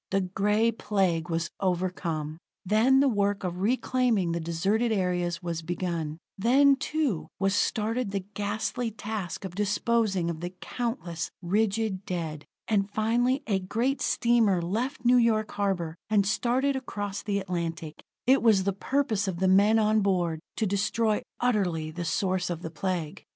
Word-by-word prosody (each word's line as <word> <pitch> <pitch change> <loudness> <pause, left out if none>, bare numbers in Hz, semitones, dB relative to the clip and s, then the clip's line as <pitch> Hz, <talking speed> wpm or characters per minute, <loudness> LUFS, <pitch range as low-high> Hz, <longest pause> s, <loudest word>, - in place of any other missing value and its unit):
The 195 0 +1
Gray 210 +5 +1
Plague 190 -6 0
was 165 0 -1
overcome. 170 -4 -2 0.3
Then 235 +7 +4
the 280 - +4
work 205 -4 +1
of 180 -1 -3
reclaiming 240 -4 +1
the 170 - -1
deserted 195 +8 0
areas 180 -4 0
was 170 -1 -3
begun; 170 -2 -3 0.2
then, 275 +6 +5
too, 280 - -1
was 195 0 +2
started 225 +3 0
the 195 -2 -3
ghastly 215 +3 -2
task 205 -3 -5
of 185 - -6
disposing 205 -1 +1
of 160 - -7
the 175 +2 -6
countless, 230 -9 -3
rigid 205 +1 0
dead. 160 -5 -4 0.2
And 200 -2 +1
finally, 240 +5 +1
a 200 -4 +1
great 230 +9 -1
steamer 230 -6 +3
left 235 - -3
New 250 +1 +6
York 220 -3 +2
harbor, 185 -5 -1
and 205 -2 +3
started 255 +6 +1
across 205 -6 -4
the 205 -1 -1
Atlantic. 170 -4 -4 0.2
It 265 +2 +5
was 215 -5 +4
the 200 0 0
purpose 220 -2 0
of 185 -3 -2
the 190 +2 +1
men 200 +4 +5
on 215 0 +3
board 175 -5 +1 0.2
to 220 - 0
destroy 210 +2 +1 0.2
utterly 180 -10 0
the 170 +2 -5
source 185 +1 0
of 175 -1 -4
the 160 - -5
Plague. 170 -2 -3
200 Hz, 155 wpm, -27 LUFS, 175-225 Hz, 0.3 s, New